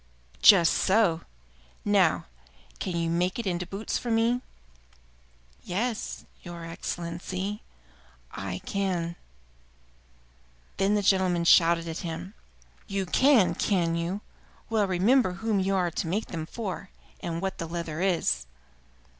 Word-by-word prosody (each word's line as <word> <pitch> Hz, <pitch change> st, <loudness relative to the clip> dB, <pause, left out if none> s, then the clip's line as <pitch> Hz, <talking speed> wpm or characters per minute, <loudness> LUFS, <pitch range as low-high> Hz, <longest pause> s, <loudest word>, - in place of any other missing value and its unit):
"Just 175 Hz, -6 st, +7 dB
so! 190 Hz, -5 st, +3 dB, 0.6 s
Now, -, -, +3 dB, 0.5 s
can 180 Hz, -, -3 dB
you 165 Hz, 0 st, 0 dB
make 175 Hz, +2 st, 0 dB
it 235 Hz, -, -3 dB
into 180 Hz, -2 st, -2 dB
boots 200 Hz, +3 st, -3 dB
for 240 Hz, -, -5 dB
me?" 230 Hz, +2 st, +2 dB, 1.2 s
"Yes, 215 Hz, -, -3 dB, 0.2 s
your 170 Hz, -2 st, -8 dB
Excellency, 175 Hz, +4 st, -4 dB, 0.7 s
I 95 Hz, -1 st, -5 dB
can." 180 Hz, -4 st, -1 dB, 1.6 s
Then 195 Hz, +2 st, +2 dB
the 205 Hz, -, +1 dB
gentleman 185 Hz, -3 st, +3 dB
shouted 170 Hz, 0 st, +5 dB
at 165 Hz, 0 st, -4 dB
him: 170 Hz, +3 st, -6 dB, 0.5 s
"You 195 Hz, -1 st, -2 dB
can, 250 Hz, +1 st, +4 dB
can 175 Hz, -5 st, +1 dB
you? 170 Hz, +4 st, -2 dB, 0.5 s
Well, 215 Hz, -3 st, +2 dB
remember 190 Hz, +3 st, +3 dB
whom 210 Hz, +2 st, 0 dB
you 195 Hz, +1 st, +1 dB
are 180 Hz, -2 st, +1 dB
to 165 Hz, -, -3 dB
make 200 Hz, +7 st, -2 dB
them 160 Hz, -3 st, -5 dB
for, 195 Hz, -3 st, -5 dB, 0.3 s
and 165 Hz, -1 st, -3 dB
what 190 Hz, +1 st, -3 dB
the 165 Hz, -, -3 dB
leather 165 Hz, -1 st, -4 dB
is. 165 Hz, -, +1 dB
180 Hz, 125 wpm, -27 LUFS, 170-200 Hz, 1.6 s, Just